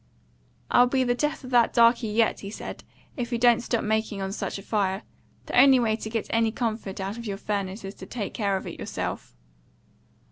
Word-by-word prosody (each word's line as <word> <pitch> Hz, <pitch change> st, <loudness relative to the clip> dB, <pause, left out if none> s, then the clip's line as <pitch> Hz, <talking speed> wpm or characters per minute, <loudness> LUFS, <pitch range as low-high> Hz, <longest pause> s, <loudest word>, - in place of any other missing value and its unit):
"I'll 245 Hz, -, +6 dB
be 260 Hz, +1 st, +1 dB
the 245 Hz, -1 st, +2 dB
death 295 Hz, +4 st, -2 dB
of 255 Hz, -, -9 dB
that 240 Hz, -2 st, +4 dB
darkey 235 Hz, 0 st, +5 dB
YET," 220 Hz, +1 st, +2 dB
he 200 Hz, -, -7 dB
said, 210 Hz, -, -7 dB, 0.3 s
"if 240 Hz, -2 st, -3 dB
he 240 Hz, -, -1 dB
don't 240 Hz, -1 st, +4 dB
stop 235 Hz, -1 st, -1 dB
making 220 Hz, -1 st, -1 dB
on 190 Hz, 0 st, -3 dB
such 200 Hz, -, -4 dB
a 195 Hz, -, -9 dB
fire. 195 Hz, -2 st, -1 dB, 0.4 s
The -, -, -4 dB
only 270 Hz, -1 st, +7 dB
way 220 Hz, -2 st, +2 dB
to 220 Hz, -, -6 dB
get 225 Hz, -1 st, -2 dB
any 225 Hz, -1 st, +2 dB
comfort 220 Hz, -4 st, -3 dB
out 195 Hz, +4 st, -4 dB
of 235 Hz, -, -7 dB
your 200 Hz, -1 st, -3 dB
furnace 200 Hz, 0 st, -3 dB
is 195 Hz, -, -6 dB
to 190 Hz, -, -8 dB
take 220 Hz, -5 st, -5 dB
care 200 Hz, -3 st, 0 dB
of -, -, -7 dB
it -, -, -7 dB
yourself." -, -, -5 dB
225 Hz, 215 wpm, -26 LUFS, 200-240 Hz, 0.4 s, only